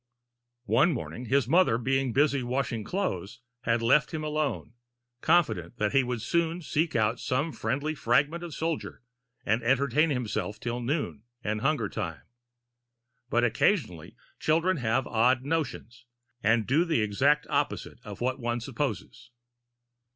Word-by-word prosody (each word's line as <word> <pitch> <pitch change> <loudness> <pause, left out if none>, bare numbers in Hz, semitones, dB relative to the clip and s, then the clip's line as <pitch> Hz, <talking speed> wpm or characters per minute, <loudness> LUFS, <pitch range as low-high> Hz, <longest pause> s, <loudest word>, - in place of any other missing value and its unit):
One 135 - +3
morning, 125 -1 -5
his 130 +1 +2
mother, 170 -5 +4
being 135 +1 0
busy 140 +2 +2
washing 125 -2 -2
clothes, 105 - -3 0.3
had 115 0 +1
left 145 +7 +3
him 155 - -3
alone, 150 -5 -2 0.5
confident 115 - +2
that 105 -2 0
he 135 - +4
would 120 -3 -3
soon 170 +1 0
seek 155 +2 0
out 110 +1 +1
some 140 +6 -1
friendly 145 +3 -2
fragment 155 +3 +1
of 170 -4 -6
soldier, 160 -5 -3 0.4
and 110 +3 +1
entertain 135 +5 +2
himself 105 -6 -2
till 120 0 -3
noon 130 -3 -2 0.2
and 105 0 -2
hunger 135 -5 +1
time. 80 -5 -5 1.1
But 120 0 +2
occasionally 110 - 0 0.2
children 165 +4 +2
have 120 0 0
odd 125 +3 +2
notions, 140 -6 -3 0.3
and 110 +1 +3
do 145 - +3
the 165 -8 +1
exact 140 +9 +2
opposite - - -2
of - - -9
what 130 +1 -1
one 120 0 -1
supposes. 120 -1 -4
130 Hz, 140 wpm, -28 LUFS, 115-150 Hz, 1.1 s, mother